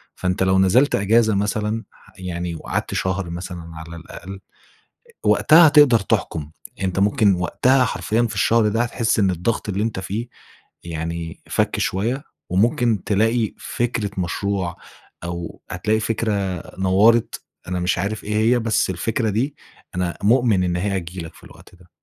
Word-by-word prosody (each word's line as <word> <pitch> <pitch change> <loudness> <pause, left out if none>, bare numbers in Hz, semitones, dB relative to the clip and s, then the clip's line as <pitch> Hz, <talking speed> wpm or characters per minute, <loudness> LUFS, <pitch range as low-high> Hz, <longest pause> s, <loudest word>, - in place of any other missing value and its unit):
فأنت 90 0 -1
لو 95 0 +3
نزلت 120 +10 +4
أجازة 110 +1 +3
مثلًا 105 +2 -1
ح - - -22
يعني 90 -2 -4
وقعدت - - -3
شهر 95 -1 -1
مثلًا 85 -1 -7
على 80 +1 -9
الأقل، 95 +3 -9 0.9
وقتها 165 +2 +6
هتقدر 145 -6 +6
تحكم 80 -5 -2 0.3
أنت 95 0 -1
ممكن 100 0 +3
وقتها 125 +9 +2
حرفيًا 115 -1 0
في 115 - -1
الشهر 115 -2 +3
ده، 115 +3 +1
هتحس 120 -2 0
إن 100 -3 +3
الضغط 90 +6 -2
اللي 100 +1 -1
أنت 110 -4 -2
فيه 105 +5 -4 0.6
يعني 85 0 -5
فكّ - - 0
شويّة، 120 +9 -1 0.3
وممكن 110 +2 +2
تلاقي 110 +2 +1
فكرة 120 -4 -2
مشروع 95 0 -2 0.5
أو 85 0 -6
هتلاقي 105 +5 0
فكرة 110 0 -1 0.5
نوّرِت، 105 +5 +3 0.2
أنا 90 0 -2
مش 90 0 0
عارف 100 +3 -3
إيه 105 +1 -2
هي 115 +3 +3
بس 110 -4 +1
الفكرة 110 +3 -1
دي 130 +8 -1 0.4
أنا 90 -1 -1
مؤمن 110 -4 +3
إن 90 -1 0
هي 95 +2 -1
هتيجي 90 +1 -7
لك 80 - -8
في - - -18
الوقت - - -16
ده. 90 0 -21
100 Hz, 155 wpm, -21 LUFS, 90-115 Hz, 0.9 s, وقتها